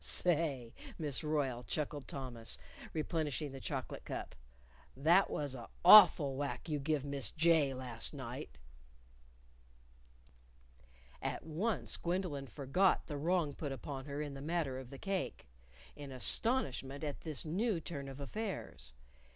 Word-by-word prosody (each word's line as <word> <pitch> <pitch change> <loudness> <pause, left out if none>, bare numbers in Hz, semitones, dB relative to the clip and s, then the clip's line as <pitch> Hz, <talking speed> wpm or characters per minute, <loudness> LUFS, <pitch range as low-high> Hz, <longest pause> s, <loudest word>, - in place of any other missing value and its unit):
_ - - -13
"Say, 145 -9 +1 0.2
Miss 150 -3 -2
Royle," 145 -5 0
chuckled 145 +5 -3
Thomas, 125 -4 -3 0.3
replenishing 155 -2 -1
the 135 - -7
chocolate - - -4
cup, - - -5 0.6
"that 170 +8 +5
was 145 -3 -2
a' 120 -3 -8 0.2
awful 175 -8 +9
whack 140 +4 -3
you 150 -2 -1
give 145 0 0
Miss 140 -2 +1
J 160 -4 +3
last 125 -3 -3
night." - - -7 2.6
At - - -3
once 160 - -1
Gwendolyn 170 -6 -2
forgot 145 - +2
the 150 - -5
wrong 165 -1 +1
put 145 -1 -4
upon 135 +1 -5
her 145 +1 -3
in 145 -2 -5
the 135 - -7
matter 150 -4 -1
of 130 -2 -9
the 135 - -9
cake 195 - -3 0.5
in 145 -2 -8
astonishment 135 - 0
at 145 -2 -4
this 155 -3 -2
new 190 +4 0
turn 145 -4 -6
of 135 +1 -9
affairs. 140 - -5
145 Hz, 135 wpm, -35 LUFS, 135-165 Hz, 2.6 s, awful